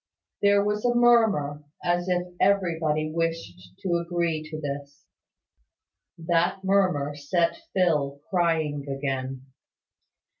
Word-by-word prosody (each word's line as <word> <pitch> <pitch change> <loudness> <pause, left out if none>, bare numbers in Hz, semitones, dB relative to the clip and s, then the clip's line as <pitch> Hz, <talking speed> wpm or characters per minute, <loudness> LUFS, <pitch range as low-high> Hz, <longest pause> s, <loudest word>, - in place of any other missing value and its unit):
There 200 0 +4
was 210 0 -1
a 240 -1 +2
murmur, 220 -12 +3 0.2
as 175 +1 0
if 180 -1 +1 0.2
everybody 165 -6 +1
wished 100 - -4
to 175 -2 +1
agree 170 -2 -1
to 155 -1 -6
this. 140 -1 -6 1.1
That 175 +3 0
murmur 185 -7 +2
set 170 - 0 0.2
Phil 150 -7 +1
crying 160 -5 0
again. 135 -1 -3
165 Hz, 105 wpm, -26 LUFS, 145-185 Hz, 1.1 s, There